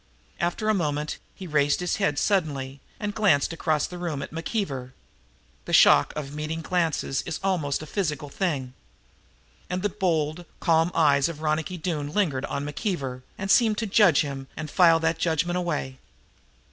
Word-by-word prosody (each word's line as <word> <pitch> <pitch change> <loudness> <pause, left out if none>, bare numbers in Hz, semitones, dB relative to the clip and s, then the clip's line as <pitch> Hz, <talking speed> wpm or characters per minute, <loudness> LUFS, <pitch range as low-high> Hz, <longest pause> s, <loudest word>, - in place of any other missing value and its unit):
After 175 +5 -1
a 215 - +4
moment 150 -5 -1 0.2
he 190 - -8
raised 145 -3 +2
his 180 -1 -1
head 195 -8 0
suddenly 140 -9 0 0.2
and 210 -1 -3
glanced 190 -9 +2
across 155 -2 0
the 180 - -8
room 160 -6 -3
at - - -8
McKeever. 160 - -3 0.7
The - - -5
shock 70 - +6
of 145 -2 -5
meeting 155 +2 -4
glances 165 -5 0
is 165 - -5
almost 155 -7 0
a - - -6
physical 155 -4 -2
thing. 140 -6 -2 1.0
And 180 +1 -2
the 205 - +2
bold, 165 -3 -1
calm 165 0 +3
eyes 145 -2 +4
of 155 -1 -8
Ronicky 155 +4 -1
Doone 155 -4 -3
lingered 155 -11 +1
on 140 - -3
McKeever 145 - -3 0.2
and 195 0 -1
seemed 220 -3 +4
to 225 - -1
judge 195 -6 +5
him 135 -2 -5
and 155 -1 -5
file 165 -3 +5
that 165 0 0
judgment 170 +2 0
away. 150 -7 -3
160 Hz, 165 wpm, -25 LUFS, 145-180 Hz, 1.0 s, shock